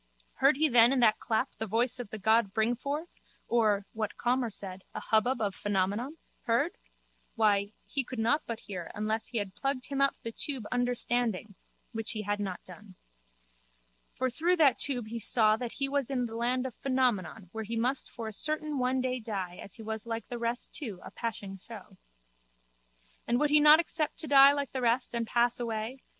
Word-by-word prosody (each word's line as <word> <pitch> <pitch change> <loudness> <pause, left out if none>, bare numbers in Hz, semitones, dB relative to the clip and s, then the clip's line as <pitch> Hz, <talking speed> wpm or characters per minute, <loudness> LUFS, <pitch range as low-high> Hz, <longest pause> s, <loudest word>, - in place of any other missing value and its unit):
Heard 270 +1 +4
he 310 +1 +4
then 240 -2 +6
in 270 - +2
that 220 -3 +4
clap 220 -2 0
the 220 - -3
voice 240 +4 0
of 240 -4 -6
the 220 - -6
god 220 0 +2
Bringforth 270 +9 -1 0.4
or, 215 -4 +2
what 215 -1 -3
Calmer 245 0 +1
said, 190 -2 -7
a - - -2
hubbub 240 +3 +2
of 205 -3 0
Phenomenon? 205 - -1 0.3
Heard? 245 +9 +2 0.6
Why, 205 -2 +2
he 275 - -1
could 255 0 -8
not 235 +7 +2
but 230 -1 -4
hear 180 -4 -7
unless 215 +1 -2
he 240 - -4
had 200 -3 -2
plugged 270 +1 -2
him 275 -1 -1
up 275 - +3
the 230 - -3
tube 260 -1 -4
Understanding 245 -4 0 0.4
(which 225 -1 0
he 215 -1 -3
had 205 +1 -1
not 190 -3 -4
done). 185 +1 -13 1.2
For 260 - 0
through 330 +8 +1
that 300 -7 +4
tube 245 -6 0
he 230 +1 -4
saw 215 -1 +3
that 240 0 -5
he 275 - 0
was 280 -2 -1
in 255 -3 0
the 225 - -7
land 250 +2 0
of 260 - -4
Phenomenon 230 -8 -1
where 220 0 -4
he 230 +2 -4
must 255 +4 0
for 230 -2 -7
a 220 - -6
certain 305 +3 -1
one 255 +1 +1
day 255 0 -1
die 195 -6 -4
as 200 - -7
he 225 - -10
was 220 +1 -5
like 230 0 -4
the 240 - -5
rest 235 +1 -1
too 220 - -4
a - - -9
passing 200 -4 -5
show. 205 -2 -12 1.3
And 240 +1 +2
would 295 -1 +2
he 300 - +7
not 300 +1 +8
accept 315 -2 -1
to 315 - -3
die 275 -1 +8
like 285 -1 -2
the 260 - -3
rest 245 +1 +1
and 235 -1 -1
pass 240 +1 +2
away? 230 +2 -4
235 Hz, 200 wpm, -30 LUFS, 215-260 Hz, 1.3 s, not